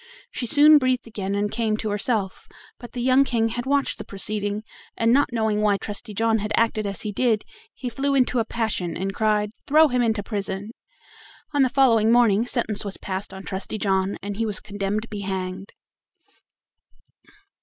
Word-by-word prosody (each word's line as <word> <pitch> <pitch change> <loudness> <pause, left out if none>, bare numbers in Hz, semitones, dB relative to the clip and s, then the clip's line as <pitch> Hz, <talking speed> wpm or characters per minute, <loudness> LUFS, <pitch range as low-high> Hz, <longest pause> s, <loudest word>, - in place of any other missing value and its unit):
She 245 - -3
soon 295 +3 +7
breathed 255 -2 0
again 200 -3 -4
and 205 0 -1
came 220 -2 0
to 215 -1 -3
herself; 205 -2 -1 0.3
but 240 - -11
the 245 - -3
young 260 +2 +5
King 230 -4 0
had 240 +3 -4
watched 280 0 +1
the - - -5
proceeding, 205 +1 -3 0.3
and 230 +1 +3
not 285 0 +3
knowing 220 -2 0
why 205 -1 +3
Trusty 210 +1 -6
John 225 +1 +2
had 210 +1 -4
acted 220 -2 +1
as 200 - -3
he 210 - -3
did, 220 0 +1 0.3
he 255 - -7
flew 275 +4 0
into 255 -2 +2
a - - +2
passion, 220 -7 -2
and 195 +2 -3
cried: 210 -1 +1 0.2
"Throw 310 +2 +6
him 250 -1 +1
into 220 -3 0
prison." 200 0 -4 0.8
On 290 - +3
the 260 - +4
following 235 -5 +4
morning 235 -2 +4
sentence 230 -5 -1
was 200 -2 -5
passed 190 +1 -5
on 190 0 -9
Trusty 195 +3 -4
John, 195 -1 0
and 200 0 -5
he 225 - 0
was 210 - +3
condemned 205 +1 -3
to - - -10
be 210 -2 -6
hanged. 190 0 -4
215 Hz, 185 wpm, -23 LUFS, 200-240 Hz, 0.8 s, soon